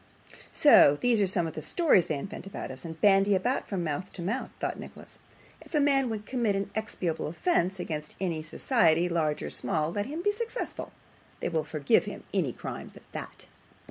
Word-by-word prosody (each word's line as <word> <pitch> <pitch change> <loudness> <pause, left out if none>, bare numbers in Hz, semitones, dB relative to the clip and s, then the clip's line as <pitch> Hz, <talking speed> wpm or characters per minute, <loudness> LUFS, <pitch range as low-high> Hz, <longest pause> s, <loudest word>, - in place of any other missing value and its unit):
'So 145 - +7
these 240 -3 +3
are 200 - +3
some 180 -2 0
of 160 - -4
the 155 - -5
stories 200 - +3
they 155 - -1
invent 195 +7 -7
about 195 - -6
us, 130 0 -9
and 160 -1 -7
bandy 195 -1 +5 0.3
from 190 -4 -2
mouth 165 +4 -3
to 175 - -6
mouth!' 230 +9 -2
thought - - -2
Nicholas. - - -11 0.4
'If - - -8
a - - +4
man 275 -3 +3
would 215 -2 -4
commit 235 -5 0
an 195 0 -2
inexpiable 185 -6 -2
offence 185 - 0
against 150 -3 -4
any 170 -4 -1
society, 170 - +2
large 155 -3 0
or - - -4
small, 160 -4 -1
let 205 +3 -2
him 315 +5 -5
be 415 - +3
successful. 465 +3 -5 0.5
They - - -2
will 160 -2 0
forgive 150 -2 +2
him - - -7
any - - +1
crime - - -7
but - - -15
that. - - -7
190 Hz, 195 wpm, -28 LUFS, 160-230 Hz, 0.5 s, So